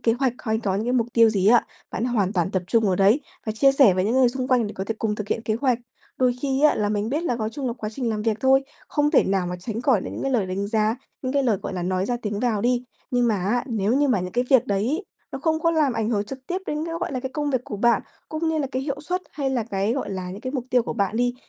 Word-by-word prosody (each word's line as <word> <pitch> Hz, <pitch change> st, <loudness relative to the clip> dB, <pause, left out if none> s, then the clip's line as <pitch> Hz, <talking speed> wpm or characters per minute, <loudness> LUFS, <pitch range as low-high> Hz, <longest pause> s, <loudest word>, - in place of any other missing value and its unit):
kế 230 Hz, -, +3 dB
hoạch 265 Hz, -3 st, +2 dB
hay 220 Hz, -1 st, -1 dB
có 200 Hz, -4 st, -1 dB
những 210 Hz, -, -2 dB
cái 245 Hz, -, +1 dB
mục 240 Hz, -3 st, +2 dB
tiêu 230 Hz, -1 st, +6 dB
gì 195 Hz, -3 st, +1 dB
á, 235 Hz, +3 st, +6 dB, 0.3 s
bạn 225 Hz, -, -2 dB
hoàn 215 Hz, -6 st, +1 dB
toàn 180 Hz, -2 st, 0 dB
tập 185 Hz, -2 st, -1 dB
trung 225 Hz, +4 st, +2 dB
vào 185 Hz, -, +2 dB
đấy 200 Hz, +9 st, +4 dB, 0.3 s
và 215 Hz, -, 0 dB
chia 270 Hz, +6 st, +4 dB
sẻ 270 Hz, -9 st, +6 dB
với 185 Hz, 0 st, +1 dB
những 220 Hz, +4 st, +1 dB
người 260 Hz, -1 st, +5 dB
xung 255 Hz, +1 st, -3 dB
quanh 250 Hz, -4 st, +3 dB
để 205 Hz, -, -6 dB
có 190 Hz, -, -3 dB
thể 225 Hz, -, -3 dB
cùng 215 Hz, -2 st, 0 dB
thực 210 Hz, -1 st, -6 dB
hiện 225 Hz, -, -1 dB
kế 220 Hz, -, -1 dB
hoạch. 255 Hz, -4 st, +2 dB, 0.4 s
Đôi 255 Hz, -1 st, +3 dB
khi 275 Hz, 0 st, 0 dB
á 300 Hz, -, +6 dB
là 210 Hz, -, 0 dB
mình 210 Hz, +1 st, -1 dB
biết 295 Hz, +6 st, -1 dB
là 250 Hz, -9 st, 0 dB
có 215 Hz, -2 st, -2 dB
chung 265 Hz, +4 st, -5 dB
nó 240 Hz, -, 0 dB
quá 225 Hz, -3 st, -5 dB
trình 245 Hz, +1 st, -2 dB
làm 215 Hz, -1 st, -2 dB
việc 220 Hz, -1 st, +1 dB
thôi, 265 Hz, +1 st, +4 dB, 0.3 s
không 295 Hz, 0 st, +1 dB
thể -, -, +5 dB
nào 190 Hz, -2 st, 0 dB
mà 180 Hz, 0 st, -3 dB
tránh 220 Hz, +5 st, -5 dB
khỏi 245 Hz, -5 st, +3 dB
được -, -, -6 dB
những -, -, -5 dB
cái 270 Hz, -, 0 dB
lời 220 Hz, -7 st, +1 dB
đánh 190 Hz, +2 st, -2 dB
giá, 215 Hz, +1 st, +1 dB, 0.3 s
những 255 Hz, -1 st, -2 dB
cái 280 Hz, 0 st, +2 dB
lời, 235 Hz, -6 st, +2 dB
gọi -, -, -4 dB
là, 180 Hz, -, -3 dB
nói 185 Hz, +1 st, 0 dB
ra 245 Hz, -, 0 dB
tiếng 210 Hz, -1 st, -2 dB
vào 230 Hz, -4 st, +1 dB
đi, 245 Hz, +2 st, +1 dB, 0.3 s
nhưng 245 Hz, -1 st, +2 dB
mà 220 Hz, -, +2 dB
á, 210 Hz, +7 st, 0 dB
nếu 220 Hz, -4 st, 0 dB
như 290 Hz, 0 st, +3 dB
mà 245 Hz, -7 st, +2 dB
những 180 Hz, 0 st, -5 dB
cái 245 Hz, +1 st, +1 dB
việc 260 Hz, -4 st, +5 dB
đấy, 230 Hz, -, 0 dB, 0.3 s
nó -, -, -4 dB
không 315 Hz, +2 st, 0 dB
có 335 Hz, -, +3 dB
làm 310 Hz, -5 st, +2 dB
ảnh 225 Hz, -1 st, -1 dB
hưởng 210 Hz, -3 st, 0 dB
trực 265 Hz, +5 st, -7 dB
tiếp 360 Hz, -, -1 dB
đến 300 Hz, +1 st, -2 dB
cái, 330 Hz, -, -4 dB
gọi 355 Hz, -4 st, -2 dB
là, 255 Hz, -, -2 dB
cái 260 Hz, 0 st, -4 dB
công 295 Hz, 0 st, -1 dB
việc 260 Hz, -3 st, +1 dB
của 210 Hz, -, -5 dB
bạn, 235 Hz, +1 st, +3 dB, 0.3 s
cũng 315 Hz, +1 st, -2 dB
như 320 Hz, -1 st, 0 dB
là 290 Hz, -, 0 dB
cái 260 Hz, -, -1 dB
hiệu 280 Hz, 0 st, -3 dB
suất, 360 Hz, +5 st, -2 dB
hay 275 Hz, -3 st, -2 dB
là 250 Hz, -4 st, 0 dB
cái, 195 Hz, +3 st, 0 dB
gọi 265 Hz, -3 st, -3 dB
là, 185 Hz, -2 st, -4 dB
những 195 Hz, +3 st, -8 dB
cái 255 Hz, +2 st, -5 dB
mục 260 Hz, -4 st, -2 dB
tiêu 245 Hz, -1 st, +4 dB
của -, -, -4 dB
bạn 200 Hz, -1 st, -1 dB
đi, 245 Hz, +1 st, +1 dB
235 Hz, 320 wpm, -24 LUFS, 210-265 Hz, 0.4 s, tiêu